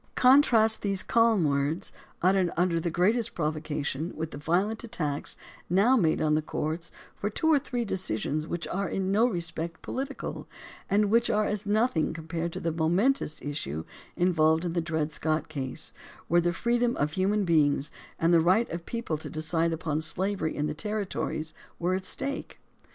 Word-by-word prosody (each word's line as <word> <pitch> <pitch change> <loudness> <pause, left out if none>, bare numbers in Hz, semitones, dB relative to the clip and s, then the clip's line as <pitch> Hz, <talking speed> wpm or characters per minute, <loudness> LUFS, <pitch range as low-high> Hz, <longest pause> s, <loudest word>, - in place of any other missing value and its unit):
Contrast 240 -4 +5
these 195 -2 0
calm 230 -5 +3
words, 145 +5 0 0.3
uttered 185 -1 +4
under 175 -1 +2
the 170 - -1
great 180 +7 +3
est 235 -3 -2
provocation, 155 0 -2
with 160 0 -4
the - - -7
violent 190 +9 0
attacks 155 -11 -3 0.3
now 200 +9 +4
made 165 -10 +2
on 155 -1 +2
the 155 - +2
courts 160 +2 -3 0.2
for 205 - -2
two 215 - -4
or 290 - +5
three 245 -3 -3
decisions 155 - -1
which 170 0 -3
are 195 +1 -1
in 190 0 -1
no 220 +5 +4
respect 170 -4 -3
political 275 +1 -5 0.4
and 205 0 +2
which 235 +1 +3
are 210 0 +2
as 210 0 -2
nothing 210 -7 +2
compared 165 +1 -4
to - - -5
the 165 - -1
momentous 165 - +1
issue 80 - -4 0.3
involved 165 -2 +3
in 170 - -2
the 170 - +1
Dred 160 -2 -2
Scott 155 0 -1
case, 140 0 -3 0.3
where 175 +1 +4
the 175 0 +1
freedom 240 +5 +1
of 150 +1 0
human 195 +4 +1
beings 150 -4 +2 0.3
and 165 +1 +3
the 165 - +6
right 190 +8 +3
of 170 - -3
the - - -24
people 230 -10 -3
to 150 - -7
decide 160 +1 0
upon 155 -2 -1
slaveiy 190 +2 0
in 150 - -1
the 150 - -2
territories 185 -3 -3 0.2
were 175 +2 0
at 185 0 -2
stake. 280 0 -3
170 Hz, 180 wpm, -28 LUFS, 155-210 Hz, 0.4 s, the